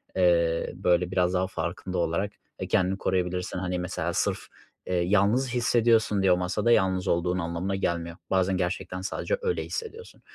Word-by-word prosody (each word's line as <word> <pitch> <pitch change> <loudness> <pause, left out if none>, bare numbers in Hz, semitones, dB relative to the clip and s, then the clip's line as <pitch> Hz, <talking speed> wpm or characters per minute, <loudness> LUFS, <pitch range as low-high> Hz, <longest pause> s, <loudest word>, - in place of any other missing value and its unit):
eee, 85 -2 +2
böyle 90 +1 +1
biraz 90 -1 +1
daha 95 0 +1
farkında 90 +1 -4
olarak 85 +4 0 0.3
e, - - -4
kendini 95 +2 +1
koruyabilirsin. 90 -1 -1
Hani, 90 0 -2
mesela 90 -1 -3
sırf, - - 0 0.5
ııı, 90 - +1
yalnız 105 +8 +2
hissediyorsun 115 -4 +3
diye 95 -1 +4
o 90 - +4
masada 95 +6 0
yalnız 95 -3 +2
olduğun 90 +1 +1
anlamına 85 +3 -2
gelmiyor. 85 -3 -2
Bazen 95 0 +2
gerçekten 90 0 -3
sadece 485 - -2
öyle 465 -2 -1
hissediyorsun 460 0 -7
90 Hz, 155 wpm, -27 LUFS, 90-100 Hz, 0.5 s, diye